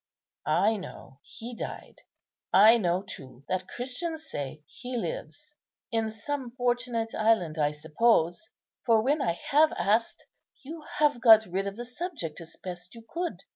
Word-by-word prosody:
I 195 Hz, +8 st, +3 dB
know 140 Hz, -7 st, -10 dB
He 235 Hz, -, -9 dB
died; -, -, -7 dB, 0.5 s
I 220 Hz, +4 st, +7 dB
know 180 Hz, -1 st, +1 dB
too 135 Hz, -9 st, -11 dB
that 185 Hz, 0 st, -2 dB
Christians 315 Hz, +6 st, -5 dB
say 145 Hz, +2 st, -6 dB
He 250 Hz, -, -6 dB
lives. -, -, -6 dB, 0.4 s
In 225 Hz, -1 st, 0 dB
some 245 Hz, +2 st, -5 dB
fortunate 245 Hz, -2 st, -1 dB
island, 215 Hz, -8 st, +2 dB
I 145 Hz, -1 st, +3 dB
suppose; 170 Hz, +5 st, +1 dB, 0.3 s
for, 225 Hz, -2 st, +4 dB
when 285 Hz, +4 st, +2 dB
I 170 Hz, -, +1 dB
have 300 Hz, -, +3 dB
asked, 220 Hz, +3 st, 0 dB, 0.4 s
you 315 Hz, +4 st, -8 dB, 0.2 s
have 290 Hz, -5 st, +3 dB
got 220 Hz, -2 st, +8 dB
rid 195 Hz, +2 st, -2 dB
of 200 Hz, -, -4 dB
the 240 Hz, -, -5 dB
subject 250 Hz, -, -6 dB
as 165 Hz, -1 st, -11 dB
best 180 Hz, +3 st, -9 dB
you 230 Hz, -1 st, -12 dB
could. 345 Hz, +6 st, -4 dB
225 Hz, 150 wpm, -28 LUFS, 180-250 Hz, 0.5 s, got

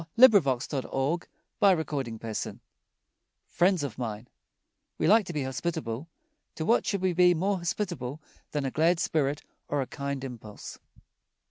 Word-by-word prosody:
[Illustration: 145 Hz, -, +5 dB, 0.7 s
ROBERT 185 Hz, -7 st, +4 dB
WILLIAM 130 Hz, -6 st, -2 dB
SERVICE] 110 Hz, -1 st, -4 dB, 0.9 s
FRIENDS 180 Hz, -2 st, +2 dB
OF 140 Hz, -6 st, -4 dB
MINE 110 Hz, -1 st, -4 dB, 0.7 s
We -, -, 0 dB
like 215 Hz, -2 st, +5 dB
to 175 Hz, -, -5 dB
be 150 Hz, -3 st, -1 dB
hospitable. 135 Hz, 0 st, -3 dB, 0.5 s
To 160 Hz, -, -3 dB
what 230 Hz, -, +3 dB
should 200 Hz, -2 st, -1 dB
we 185 Hz, -1 st, +2 dB
be 180 Hz, 0 st, +5 dB
more 195 Hz, +4 st, +1 dB
hospitable 170 Hz, -7 st, -3 dB, 0.3 s
than 145 Hz, -2 st, -2 dB
a 135 Hz, -, -1 dB
glad 165 Hz, +4 st, +3 dB
spirit 145 Hz, -3 st, 0 dB, 0.2 s
or 145 Hz, -, -1 dB
a 135 Hz, -, 0 dB
kind 140 Hz, 0 st, -4 dB
impulse? 115 Hz, -5 st, -8 dB
150 Hz, 140 wpm, -28 LUFS, 130-180 Hz, 0.9 s, Illustration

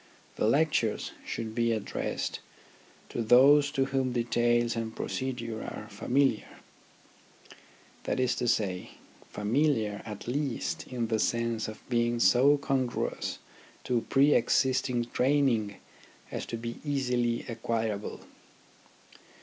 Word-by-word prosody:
The -, -, +1 dB
lectures 135 Hz, -4 st, +1 dB
should 110 Hz, -1 st, -5 dB
be 115 Hz, 0 st, +1 dB
addressed 110 Hz, -3 st, -3 dB, 0.7 s
to -, -, -3 dB
those 140 Hz, +5 st, +6 dB
to 135 Hz, -2 st, +2 dB
whom 135 Hz, -2 st, -1 dB
details 120 Hz, 0 st, +1 dB
and 115 Hz, -1 st, -4 dB
procedure 120 Hz, -4 st, -4 dB
are 105 Hz, -, -7 dB
familiar; 125 Hz, +3 st, 0 dB, 1.5 s
that -, -, -1 dB
is 130 Hz, -1 st, +2 dB
to 120 Hz, -, -1 dB
say, 95 Hz, -5 st, -1 dB, 0.4 s
familiar 110 Hz, -1 st, 0 dB
at 105 Hz, -1 st, -8 dB
least 140 Hz, 0 st, -2 dB
in 120 Hz, -3 st, -3 dB
the 110 Hz, -1 st, +1 dB
sense 115 Hz, 0 st, 0 dB
of 110 Hz, -, -10 dB
being 120 Hz, -1 st, +1 dB
so 125 Hz, +9 st, +5 dB
congruous 135 Hz, -3 st, -2 dB, 0.5 s
to 120 Hz, -2 st, 0 dB
pre 140 Hz, +2 st, +5 dB
existing 130 Hz, -2 st, +2 dB
training 125 Hz, -7 st, +2 dB, 0.6 s
as -, -, -4 dB
to 115 Hz, -, -4 dB
be 115 Hz, +1 st, -6 dB
easily 125 Hz, -5 st, 0 dB
acquirable. 115 Hz, -3 st, -3 dB
120 Hz, 115 wpm, -29 LUFS, 115-130 Hz, 1.5 s, those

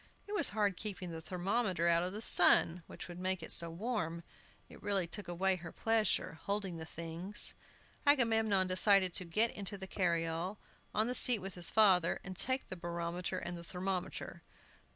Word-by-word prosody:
It 415 Hz, -, -8 dB
was 415 Hz, -, +3 dB
hard 205 Hz, -2 st, -1 dB
keeping 190 Hz, -4 st, -5 dB
the 165 Hz, 0 st, -7 dB
thermometer 185 Hz, 0 st, -1 dB
out 170 Hz, 0 st, +3 dB
of 180 Hz, +1 st, -3 dB
the 215 Hz, +3 st, -7 dB
sun, 175 Hz, -2 st, +4 dB
which -, -, -9 dB
would 175 Hz, 0 st, -9 dB
make 185 Hz, 0 st, -2 dB
it -, -, -6 dB
so 170 Hz, 0 st, +8 dB
warm. 170 Hz, -3 st, -4 dB, 0.4 s
It -, -, -15 dB
really 200 Hz, -3 st, +1 dB
took 205 Hz, +5 st, -7 dB
away 185 Hz, +2 st, 0 dB
her 170 Hz, -1 st, -9 dB
pleasure, 225 Hz, -7 st, 0 dB
holding 200 Hz, -4 st, -3 dB
the 160 Hz, 0 st, -8 dB
things. 170 Hz, +6 st, -1 dB, 0.5 s
Agamemnon 225 Hz, -8 st, +3 dB
decided 185 Hz, 0 st, +4 dB
to 185 Hz, -, -1 dB
get 215 Hz, +8 st, +1 dB
into 200 Hz, 0 st, -5 dB
the 190 Hz, -, -7 dB
carryall, 170 Hz, 0 st, -2 dB, 0.4 s
on 215 Hz, -, +2 dB
the 245 Hz, -, -2 dB
seat 250 Hz, -1 st, +7 dB
with 195 Hz, -1 st, -7 dB
his 175 Hz, -2 st, -1 dB
father, 190 Hz, -6 st, +3 dB
and 190 Hz, -1 st, -7 dB
take 260 Hz, +7 st, -2 dB
the -, -, -5 dB
barometer 170 Hz, 0 st, -4 dB
and 175 Hz, -1 st, -6 dB
thermometer. 185 Hz, +1 st, -5 dB
185 Hz, 175 wpm, -33 LUFS, 170-210 Hz, 0.5 s, so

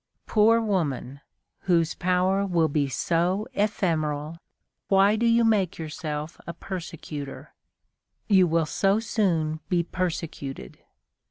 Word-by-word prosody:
Poor 225 Hz, +1 st, +4 dB
woman, 145 Hz, -, -2 dB, 0.5 s
whose 165 Hz, -2 st, +3 dB
power 185 Hz, +2 st, +1 dB
will 175 Hz, -5 st, +2 dB
be 145 Hz, -2 st, 0 dB
so 175 Hz, -, 0 dB
ephemeral, 165 Hz, -7 st, -1 dB, 0.5 s
why 195 Hz, +2 st, +4 dB
do 235 Hz, +2 st, +1 dB
you 230 Hz, 0 st, +4 dB
make 205 Hz, -6 st, +2 dB
yourself 155 Hz, 0 st, -5 dB
a 170 Hz, -, -5 dB
persecutor? 165 Hz, -6 st, -7 dB, 0.7 s
You 190 Hz, -4 st, +5 dB
will 165 Hz, 0 st, +1 dB
so 195 Hz, +6 st, +1 dB
soon 170 Hz, -9 st, 0 dB
be 175 Hz, -3 st, +2 dB
persecuted. 165 Hz, -, -5 dB
175 Hz, 110 wpm, -25 LUFS, 155-195 Hz, 0.7 s, You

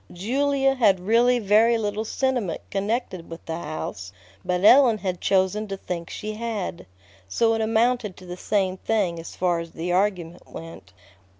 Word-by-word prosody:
Julia 270 Hz, +8 st, +1 dB
had 210 Hz, -8 st, +3 dB
really 235 Hz, +6 st, +3 dB
very 225 Hz, +2 st, +4 dB
little 215 Hz, 0 st, -2 dB
sentiment 245 Hz, -, -1 dB
connected 200 Hz, -3 st, -2 dB
with 165 Hz, 0 st, -10 dB
the 165 Hz, 0 st, -4 dB
house, 95 Hz, -, -6 dB, 0.3 s
but 180 Hz, +1 st, 0 dB
Ellen 250 Hz, -2 st, +7 dB
had 185 Hz, -4 st, -4 dB
chosen 195 Hz, +3 st, +1 dB
to 195 Hz, -1 st, -5 dB
think 170 Hz, -3 st, -5 dB
she 215 Hz, 0 st, -5 dB
had; 215 Hz, -, -4 dB, 0.4 s
so 225 Hz, -, +2 dB
it 225 Hz, -, -1 dB
amounted 225 Hz, -2 st, +1 dB
to 185 Hz, -, -13 dB
the 180 Hz, 0 st, -7 dB
same 190 Hz, 0 st, -1 dB
thing 190 Hz, -6 st, -1 dB
as 165 Hz, -, -9 dB
far 175 Hz, -2 st, +1 dB
as 165 Hz, 0 st, -8 dB
the 170 Hz, +2 st, -3 dB
argument 180 Hz, -3 st, -1 dB
went. 165 Hz, -, -10 dB
200 Hz, 165 wpm, -24 LUFS, 180-225 Hz, 0.4 s, Ellen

